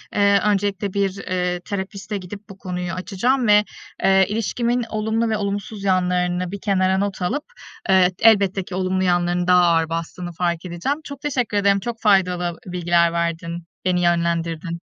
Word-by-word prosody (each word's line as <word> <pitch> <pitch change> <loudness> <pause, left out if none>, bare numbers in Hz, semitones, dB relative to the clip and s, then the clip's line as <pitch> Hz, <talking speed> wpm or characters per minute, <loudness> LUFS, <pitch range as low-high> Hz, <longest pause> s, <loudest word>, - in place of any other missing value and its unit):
eee, 200 -1 +4
öncelikle 200 -1 0
bir, 195 -1 0
eee, 180 -2 -2
terapistle 195 +2 -5
gidip 200 +3 -10
bu 195 - -11
konuyu 180 -2 -4
açacağım 230 +7 0
ve, 210 0 +6 0.4
eee, 190 0 +5
ilişkimin 235 +3 -1
olumlu 220 +1 -1
ve 220 - 0
olumsuz 200 0 -4
yanlarını 180 -1 0
bir 200 -1 -6
kenara 190 -2 +2
not 195 -1 -2
alıp, 275 +12 -1 0.5
eee, 185 -1 +5
elbette 200 -4 +4
ki 180 - -7
olumlu 185 0 0
yanlarının 175 0 +1
daha 180 0 +6
ağır 165 -1 +2
bastığını 165 +2 -4
fark 170 0 -2
edeceğim. 180 - -3
Çok 280 -2 -9
teşekkür 250 -7 -1
ederim, 200 0 +3
çok 230 +2 -5
faydalı 185 -4 +3 0.2
ı 180 - -7
bilgiler 170 -1 +2
verdin, 170 0 -2 0.2
beni 180 -1 +2
yönlendirdin. 170 0 0
190 Hz, 160 wpm, -21 LUFS, 180-205 Hz, 0.5 s, ve